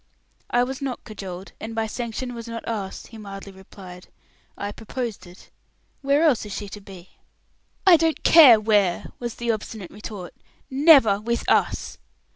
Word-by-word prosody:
"I 240 0 +3
was 265 +2 -5
not 265 -3 -4
cajoled, 190 -3 -8
and 225 +1 -7
my 225 0 0
sanction 240 +2 -5
was 235 -1 -8
not 230 0 -7
asked," 205 -4 -5
he 225 - -11
mildly 195 -1 -9
replied. 190 -1 -13 0.5
"I 205 - -4
proposed 225 -2 -6
it. 175 +1 -16 0.5
Where 280 +3 +2
else 290 -9 +3
is 210 -2 -7
she 205 - -6
to 205 - -9
be?" 190 -2 -13 0.8
"I 365 -3 +8
don't 320 0 0
care 280 -9 +8
where," 205 -5 +1
was 240 -2 -5
the 235 -1 -1
obstinate 215 -3 -6
retort. 205 -3 -8 0.4
"Never 265 -8 +6
with 235 +2 -2
us." - - 0
220 Hz, 160 wpm, -23 LUFS, 195-245 Hz, 0.8 s, I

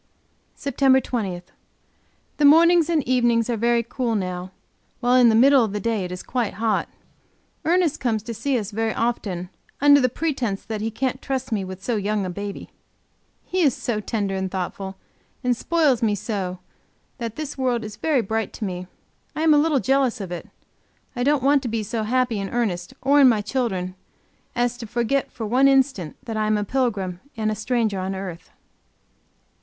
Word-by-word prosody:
SEPTEMBER 270 -1 +3
20. 200 -9 -3 0.9
The 295 - +3
mornings 335 +2 +6
and 315 -7 +1
evenings 240 -2 +2
are - - +1
very 235 +1 +2
cool 235 -1 -2
now, 185 -2 -3 0.5
while 245 +1 +2
in 250 -2 +6
the 220 - +3
middle 265 +2 +6
of 215 -3 -2
the 210 - -1
day 220 -1 -1
it 180 - -5
is 180 - -6
quite 240 -4 -2
hot. 220 0 0 0.8
Ernest 340 -2 +2
comes 225 -4 -1
to 230 +1 -5
see 250 +4 0
us 210 -2 -4
very 220 +1 -1
often, 195 -7 -2 0.3
under 285 0 +6
the 255 - +3
pretense 255 -8 -2
that 220 -2 -4
he 220 - -1
can't 255 +3 -2
trust 265 -2 -3
me 205 -3 0
with 185 0 -8
so 240 -3 0
young 205 0 -1
a 180 - -3
baby! 200 +2 -6 0.7
He 370 - -1
is 280 -7 +3
so 230 -3 -2
tender 205 -2 -2
and 190 0 -2
thoughtful, 190 +1 -4 0.5
and 250 -1 +2
spoils 295 -2 +2
me 215 -3 +2
so, 190 -3 -3 0.6
that 230 -2 -4
this 300 -2 -5
world 250 -3 0
is 215 -1 -7
very 295 0 +1
bright 220 +1 -2
to 215 - -4
me; 180 -1 -5 0.5
I 310 - -1
am 320 -1 +6
a 295 - +5
little 300 -2 +2
jealous 265 -3 +1
of 190 -3 -6
it; 175 - -6 0.7
I 245 - -3
don't 285 0 +2
want 280 0 +4
to 255 - -4
be 225 -1 -2
so 225 +2 -3
happy 240 0 0
in 195 0 -3
Ernest, 190 -7 -2
or 285 +2 +5
in 265 - +8
my 220 -3 +2
children, 205 -6 -2 0.6
as 245 0 0
to 230 - -6
forget 240 +5 0
for 225 - -5
one 255 +6 +4
instant 265 - +2
that 225 -2 -4
I 215 0 0
am 215 0 +2
a 210 - -1
pilgrim 205 -7 -1 0.2
and 215 -1 0
a - - -2
stranger 220 -2 0
on 190 +1 -3
earth. 185 -3 -7
230 Hz, 190 wpm, -23 LUFS, 205-260 Hz, 0.9 s, in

